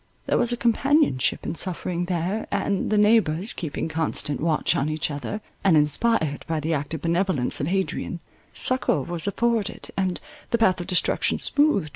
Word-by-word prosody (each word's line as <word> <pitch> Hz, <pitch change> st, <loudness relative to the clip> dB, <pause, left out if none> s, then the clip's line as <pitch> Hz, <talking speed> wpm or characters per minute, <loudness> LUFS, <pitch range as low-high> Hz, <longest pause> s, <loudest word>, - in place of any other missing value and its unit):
There -, -, +1 dB
was 240 Hz, -, +1 dB
a 240 Hz, -, -1 dB
companionship 265 Hz, -, +2 dB
in -, -, -2 dB
suffering 175 Hz, 0 st, -2 dB
there, 180 Hz, +4 st, -2 dB
and, 200 Hz, -2 st, -1 dB
the 215 Hz, -, +2 dB
neighbours 210 Hz, -3 st, +3 dB
keeping 160 Hz, -2 st, -4 dB
constant 160 Hz, -2 st, -2 dB
watch 160 Hz, -1 st, +1 dB
on 140 Hz, +2 st, 0 dB
each 155 Hz, 0 st, -2 dB
other, 145 Hz, -, -5 dB, 0.2 s
and 180 Hz, -5 st, +5 dB
inspired 150 Hz, +1 st, +2 dB
by 160 Hz, -1 st, -1 dB
the 160 Hz, +2 st, -1 dB
active 145 Hz, +1 st, -3 dB
benevolence 170 Hz, -7 st, 0 dB
of 140 Hz, -, -1 dB
Adrian, 185 Hz, -1 st, -2 dB, 0.3 s
succour 255 Hz, -, +1 dB
was 175 Hz, +3 st, -4 dB
afforded, 230 Hz, 0 st, -1 dB
and 190 Hz, -2 st, -1 dB, 0.3 s
the 235 Hz, -, +2 dB
path 190 Hz, -6 st, +2 dB
of 175 Hz, -, -7 dB
destruction 180 Hz, -2 st, +2 dB
smoothed. 285 Hz, -, +2 dB
175 Hz, 165 wpm, -24 LUFS, 155-210 Hz, 0.3 s, and